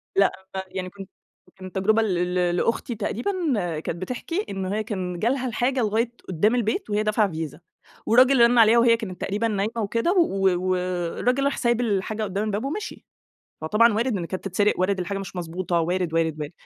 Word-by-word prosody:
لأ، 195 0 +4 0.4
يعني 185 0 -5
كنت 195 0 -11 0.5
كان 185 -1 -10
تجربة 215 +4 +2
ل 180 -4 0
ل 175 -1 +1
لأختي 230 +5 -1
تقريبًا، 220 - -2 0.5
كانت 170 +2 -5
بتحكي، 330 - -3
إن 195 -1 -3
هي 205 +3 -1
كان 185 -5 -4
جالها 255 +5 0
الحاجة 250 +3 0
لغاية 225 +2 0 0.2
قُدّام 205 +7 +2
البيت 245 - -1
وهي 210 +1 +1
دافعة 215 -2 +1
فيزا، 160 -3 -5 0.5
والراجل 255 +3 +5
رَن 240 +1 +5
عليها 225 0 +6
وهي 235 -1 +5
كانت 195 -6 -7
تقريبًا 210 +4 -1
نايمة 210 0 -1
وكده، 230 - 0
و 195 - +2
والراجل 185 +8 0
راح 280 - 0
سايب 240 -1 +1
الحاجة 215 -1 -1
قُدّام 200 0 -2
الباب 215 +2 -2
ومشي. 355 +10 -5 0.6
فطبعًا 215 +9 +4
وارد 230 +1 0
إن 175 - -3
كانت 185 +2 -6
تتسرق، 200 +2 +1
وارد 190 +1 +1
الحاجة 195 +2 -3
مش 190 -2 -8
مضبوطة، 175 0 -2
وارد، 175 0 -1
وارد، 160 -2 0
وارد. 150 +1 -5
205 Hz, 180 wpm, -24 LUFS, 185-230 Hz, 0.6 s, عليها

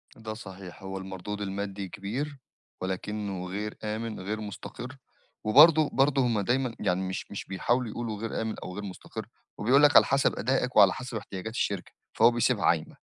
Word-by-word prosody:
ده 110 -1 -6
صحيح. 95 -3 -10
هو 95 0 -5
المردود 95 +2 -6
المادّي 100 -1 -4
كبير، 130 - -4 0.4
ولكنه 95 0 -3
غير 105 +3 -4
آمِن 110 +1 -3
غير 105 +4 -3
مستقِر. 120 +5 -7 0.5
وبرضه 150 +7 +7
برضه 135 0 +3
هُم 115 -3 +1
دايمًا 120 +3 0
يعني 90 +1 +1
مش 95 0 -4
مش 100 - -5
بيحاولوا 120 +6 0
يقولوا 110 -1 -4
غير 115 0 -2
آمِن 110 -1 -2
أو 90 - -7
غير 105 - -5
مستقِر، 95 -2 -7 0.3
وبيقول 130 +7 +4
لك 145 - +6
على - - +9
حسب 140 0 +2
أداءك 130 -1 0
وعلى 100 -3 +7
حسب 125 -3 -5
احتياجات 100 +1 -6
الشركة، - - -2 0.2
فهو 115 +2 +6
بيسيبها 120 -2 +1
عايمة. 80 -2 +1
105 Hz, 170 wpm, -28 LUFS, 95-120 Hz, 0.5 s, على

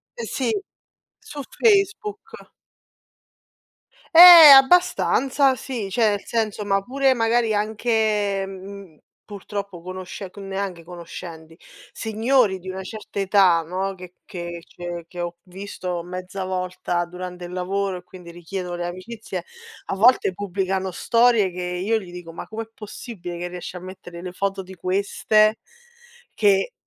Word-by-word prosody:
Sì, 475 - -2 0.7
su 295 -1 -9 0.2
Facebook. 430 +1 0 1.6
Eh! 340 -3 +12
Abbastanza 270 -3 +4
sì, 240 -6 -5
cioè 225 0 +3
nel 205 -1 -3
senso, 215 -3 -2
ma 195 -1 +1
pure, 265 +4 +1
magari 230 -1 +1
anche, 210 -2 0
mhmm, 195 -3 -10 0.3
purtroppo 200 -3 -7
conosce 185 +1 -7
c - - -24
neanche 195 -3 -5
conoscenti, 170 -2 -10 0.4
signori 225 -1 +1
di 185 +1 -9
una 190 0 -6
certa 205 +1 -7
età, 190 -4 +4
no, 190 +4 -3
che 180 -1 -12
che 175 -2 -7
cioè 175 -1 -7
che 175 - -11
ho 175 0 -5
visto 180 -2 -6
mezza 185 +2 -6
volta 180 -1 -2
durante 180 0 -8
il 175 - -9
lavoro, 190 +1 -2
e 180 - -12
quindi 180 -1 -13
richiedono 175 +1 -6
le 175 - -3
amicizie, 215 - -7 0.4
a - - -3
volte 215 -2 +4
pubblicano 190 -1 -2
storie 230 0 +3
che 180 +1 -6
io 185 +5 -1
gli 180 -3 -11
dico: 175 -2 -10
"Ma - - -8
come 225 +1 -5
è 225 - -18
possibile 205 -5 -8
che 175 +1 -4
riesci 180 0 -8
a 180 - -5
mettere 175 -1 -10
le 180 - -5
foto 195 +1 -3
di 190 +1 -12
queste?" 200 +4 +1 0.7
Che 195 -2 +2
195 Hz, 140 wpm, -22 LUFS, 180-220 Hz, 1.6 s, Eh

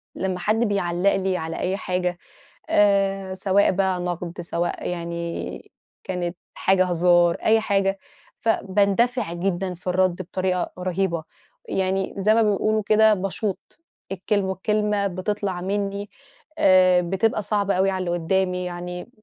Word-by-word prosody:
لمّا 185 -1 -2
حَد 215 +4 +1
بيعلّق 190 -1 +1
لي 190 -1 0
على 160 -1 -5
أي 190 +2 -1
حاجة 180 -3 -2 0.5
آآ، 195 -6 +2
سواء 195 +1 +3
بقى 190 -1 0
نقد 175 0 -4
سواء 170 0 -3
يعني 170 -1 -5 0.3
كانت 175 -1 -3 0.2
حاجة 185 -1 +3
هزار، 175 -1 +3
أي 225 0 +3
حاجة، 195 -2 0 0.4
ف 225 - 0
باندفع 205 +1 +1
جدًا 185 +1 -2
في 175 +1 -13
الرَد 185 0 +1
بطريقة 185 0 -2
رهيبة، 180 -2 -1 0.5
يعني 190 0 -1
زَيّ 210 +3 +3
ما 230 - +4
بيقولوا 215 0 +1
كده 220 0 +5
باشوط 195 +5 -4 0.3
الكلم 195 +1 0
والكلمة 205 +2 0
بتطلع 190 0 -3
منّي 200 +1 -2 0.5
آآ، 185 - +5
بتبقى 195 +5 0
صعبة 200 -1 0
أوي 190 +1 +2
على 185 -1 -2
اللي 175 - -1
قُدّامي، 180 +1 0
يعني 180 +2 -6
190 Hz, 135 wpm, -23 LUFS, 180-200 Hz, 0.5 s, كده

